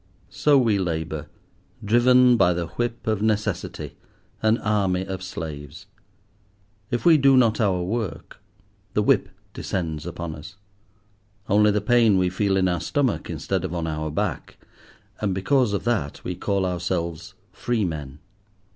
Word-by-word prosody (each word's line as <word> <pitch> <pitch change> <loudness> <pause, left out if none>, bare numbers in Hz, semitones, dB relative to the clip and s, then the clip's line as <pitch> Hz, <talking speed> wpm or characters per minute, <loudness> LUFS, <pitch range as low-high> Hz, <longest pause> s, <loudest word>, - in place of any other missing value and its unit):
So 145 -2 +3
we 115 -6 +2
labour, 80 -4 -3 0.6
driven 125 +3 +5
by 90 -5 +4
the 85 0 -2
whip 120 -1 -3
of 110 -2 0
necessity, 105 -1 -2 0.4
an 110 +1 +3
army 95 -4 0
of 95 -1 -5
slaves. 80 -1 -7 1.0
If 120 - -2
we 165 -3 +7
do 135 -1 +5
not 115 -3 +3
our 95 -4 +1
work, 105 -1 -4 0.5
the 105 - +2
whip - - +2 0.2
descends 80 -4 -4
upon 85 -1 -5
us; 75 +4 -11 0.9
only 105 +1 +4
the 105 0 +1
pain 115 -2 +4
we 90 -1 +1
feel 95 +1 +1
in 95 -1 +2
our 90 -1 -1
stomach 135 -6 -1
instead - - -2
of 85 - -4
on 85 -1 -2
our 80 -1 -3
back. 75 - -3 0.6
And 100 -3 -1
because 125 +4 +2
of 100 - -2
that, 110 -12 -2
we 90 - -3
call 100 +1 -1
ourselves 85 -2 -3 0.2
free 120 -4 -1
men. 75 -5 -5
95 Hz, 145 wpm, -24 LUFS, 85-110 Hz, 1.0 s, we